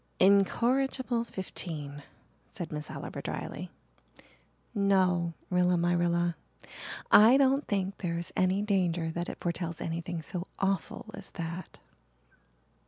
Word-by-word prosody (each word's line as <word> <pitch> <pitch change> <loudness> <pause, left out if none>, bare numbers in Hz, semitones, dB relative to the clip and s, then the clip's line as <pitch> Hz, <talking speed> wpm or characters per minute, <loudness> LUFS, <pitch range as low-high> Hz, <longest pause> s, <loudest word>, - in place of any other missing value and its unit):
"Incorrigible 240 +6 +3
fifteen!" 165 -9 -5 0.5
said 175 -7 -7
Miss 150 0 -4
Oliver - - -6
dryly. - - -5 1.0
"No, 185 -5 +2 0.2
Rilla 180 0 +3
my 175 +1 +2
Rilla, 175 0 +1 0.8
I 225 +5 +9
don't 275 +1 +3
think 195 -1 -1
there 170 -3 -2
is 170 - -5
any 185 +2 +2
danger 175 -5 +1
that 175 +1 -3
it - - -6
foretells 170 -1 -3
anything 165 0 -3
so 180 +2 -5
awful 195 0 -1
as 200 -1 -6
that." 170 +2 -5
180 Hz, 115 wpm, -30 LUFS, 170-200 Hz, 1.0 s, I